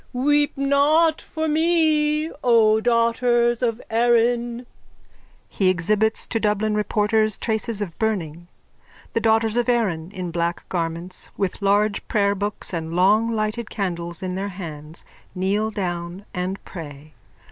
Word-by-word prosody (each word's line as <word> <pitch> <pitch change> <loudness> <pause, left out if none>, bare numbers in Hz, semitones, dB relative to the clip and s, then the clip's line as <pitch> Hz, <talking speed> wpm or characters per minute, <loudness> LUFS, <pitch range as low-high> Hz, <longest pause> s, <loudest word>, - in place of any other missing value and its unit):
_ - - -34
Weep 290 +3 +1
not 295 +4 +3
for 315 -1 -4
me, 310 -1 +2
O 220 -3 +4
daughters 235 0 +2
of 230 -2 0
Erin. 240 +1 +2 0.9
_(He 190 -2 +2
exhibits 210 +5 +1
to 225 - -2
Dublin 210 0 0
reporters 210 0 +1
traces 220 -1 -2
of 170 -5 -8
burning. 175 -7 -2 0.7
The - - +1
daughters 225 0 +2
of 240 +1 +1
Erin, 190 -9 0
in 185 -3 -5
black 170 0 -2
garments, 170 +1 -4
with 195 0 -2
large 205 +1 +2
prayerbooks 205 -1 -1
and 165 -1 -4
long 210 +5 +4
lighted 215 0 -2
candles 175 -4 -4
in 185 -1 -3
their 195 +2 -3
hands, 160 -4 -8 0.3
kneel 200 +4 0
down 175 -2 -4
and 180 +2 -2
pray.) 155 -3 -10
215 Hz, 130 wpm, -22 LUFS, 185-235 Hz, 0.9 s, O